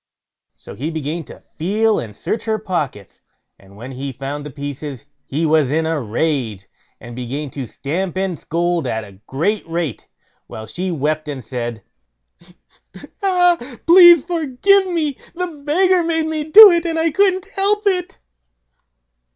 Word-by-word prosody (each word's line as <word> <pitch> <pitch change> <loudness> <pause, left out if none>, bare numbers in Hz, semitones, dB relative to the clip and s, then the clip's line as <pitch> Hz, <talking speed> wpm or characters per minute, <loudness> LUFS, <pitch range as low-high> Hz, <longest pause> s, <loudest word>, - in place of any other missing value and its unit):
So - - -12
he 150 +6 -4
began 160 +1 -4
to - - -13 0.2
feel 210 +6 +1
and 105 -3 -8
search 225 - -3
her 220 -1 0
pockets, 150 - -5 0.4
and 100 +1 -18
when 125 +5 -9
he 135 +1 -5
found 140 +3 -6
the 150 - -7
pieces 145 -1 -7 0.2
he 155 +4 -1
was 155 -4 +2
in 160 +3 0
a 160 -2 -1
rage, 115 - -2 0.3
and 120 0 -10
began 130 +4 -5
to 135 -2 -6
stamp 175 +9 -4
and 190 -4 -2
scold 170 -2 -1
at 110 -2 -2
a 100 -2 -15
great 195 +10 -1
rate, 165 - -4 0.4
while 110 - -8
she 185 +10 -4
wept 155 -1 -2
and 135 -6 -6
said: 120 -1 -5 1.4
"Ah, 360 -3 +3 0.3
pray 345 0 +9
forgive 340 +4 +1
me; 315 -6 -2 0.2
the 360 +1 -2
beggar 345 +4 +1
bade 325 -1 0
me 315 -1 -3
do 410 +6 +10
it, 340 -1 +1
and 330 -2 -2
I 325 0 +1
couldn't 380 +2 +2
help 415 +2 +3
it." 365 -3 -1
165 Hz, 155 wpm, -19 LUFS, -, 1.4 s, do